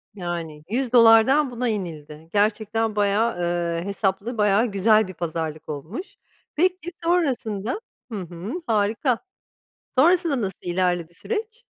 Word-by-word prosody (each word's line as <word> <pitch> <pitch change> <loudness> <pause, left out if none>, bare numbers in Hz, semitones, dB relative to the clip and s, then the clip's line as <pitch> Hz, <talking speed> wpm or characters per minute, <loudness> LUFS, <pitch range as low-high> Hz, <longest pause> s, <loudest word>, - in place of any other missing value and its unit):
Yani, 170 -4 -5
$100’dan 245 +2 +5
buna 245 0 -1
inildi. 160 -6 -5
Gerçekten 215 +1 +1
bayağı, 210 +2 +2
ııı, 170 -1 -1
hesaplı, 200 +3 -2
bayağı 210 +2 +3
güzel 215 0 +3
bir 185 - -8
pazarlık 160 -2 -4
olmuş. 160 - -6 0.4
Peki, 355 +1 +1
sonrasında 260 - 0 0.3
Hı 210 - -3
hı, 175 - -7
harika. 225 +3 +1 0.7
Sonrasında 325 -1 +3
nasıl 190 -3 -3
ilerledi 175 -2 0
süreç? 450 - -5
210 Hz, 110 wpm, -24 LUFS, 175-250 Hz, 0.7 s, $100’dan